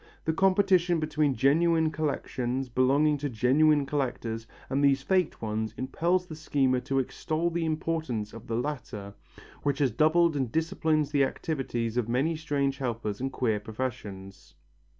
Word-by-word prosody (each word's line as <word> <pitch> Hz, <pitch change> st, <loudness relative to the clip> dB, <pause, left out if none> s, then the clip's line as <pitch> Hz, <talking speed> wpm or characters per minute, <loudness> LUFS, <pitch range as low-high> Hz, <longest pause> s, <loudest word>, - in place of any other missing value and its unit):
The 160 Hz, -, +1 dB
competition 185 Hz, -2 st, +3 dB
between 155 Hz, -3 st, +1 dB
genuine 160 Hz, +5 st, +3 dB
collections 135 Hz, -4 st, -2 dB
belonging 140 Hz, +4 st, +3 dB
to 145 Hz, 0 st, -2 dB
genuine 140 Hz, +5 st, +3 dB
collectors 120 Hz, -5 st, -3 dB, 0.2 s
and 140 Hz, +2 st, 0 dB
these 140 Hz, -1 st, +3 dB
faked 185 Hz, -8 st, 0 dB
ones 110 Hz, 0 st, -2 dB
impels 170 Hz, +8 st, 0 dB
the 160 Hz, -, -8 dB
schemer 135 Hz, -4 st, +1 dB
to 135 Hz, +2 st, -2 dB
extol 155 Hz, +5 st, -1 dB
the 170 Hz, 0 st, -1 dB
importance 155 Hz, -9 st, -2 dB
of 115 Hz, 0 st, -11 dB
the 115 Hz, -, -2 dB
latter, 115 Hz, -7 st, -4 dB, 0.5 s
which 140 Hz, -1 st, 0 dB
has 140 Hz, -4 st, +2 dB
doubled 160 Hz, +5 st, +3 dB
and 130 Hz, -5 st, -1 dB
disciplined 160 Hz, 0 st, +1 dB
the 145 Hz, -2 st, +3 dB
activities 125 Hz, -5 st, -2 dB
of 120 Hz, -2 st, 0 dB
many 140 Hz, +7 st, +1 dB
strange 140 Hz, -3 st, -1 dB
helpers 115 Hz, -4 st, -3 dB
and 135 Hz, 0 st, -2 dB
queer 115 Hz, -5 st, 0 dB
professions. 105 Hz, -4 st, -6 dB
140 Hz, 150 wpm, -28 LUFS, 120-155 Hz, 0.5 s, competition